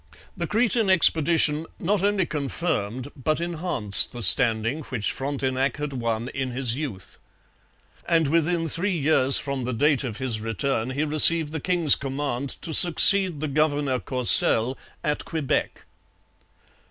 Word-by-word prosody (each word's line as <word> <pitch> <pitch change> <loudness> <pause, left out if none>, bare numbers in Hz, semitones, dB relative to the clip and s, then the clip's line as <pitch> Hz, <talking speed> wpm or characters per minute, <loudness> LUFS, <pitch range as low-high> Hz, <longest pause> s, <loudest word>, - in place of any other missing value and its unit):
The 170 -1 -5
Cretan 220 0 0
expedition 160 -3 +2
not 200 +2 -1
only 200 -2 -1
confirmed 140 -5 -5
but 155 +4 -3
enhanced 165 - +1
the 120 -1 -5
standing 115 - +3
which 110 -6 -3
Frontenac 135 -1 -4
had 150 -1 -6
won 115 -2 -4
in 135 -2 -5
his 125 -1 -1
youth. 130 -11 -9 0.9
And 165 -2 0
within 165 +2 -1
three 180 +4 -2
years 140 -3 +3
from 140 -2 -4
the 125 +1 -5
date 145 +4 0
of 120 -5 -7
his 125 -5 -2
return 115 +2 -3
he 140 +3 -4
received 155 +1 +5
the 160 - -5
king's 170 -2 +2
command 140 -1 -5
to 160 - -5
succeed 180 0 +6
the 155 - -3
governor 145 -2 -2
Courcelles 125 -1 +2 0.3
at 150 0 -3
Quebec. 155 -5 -4
145 Hz, 140 wpm, -22 LUFS, 130-165 Hz, 0.9 s, succeed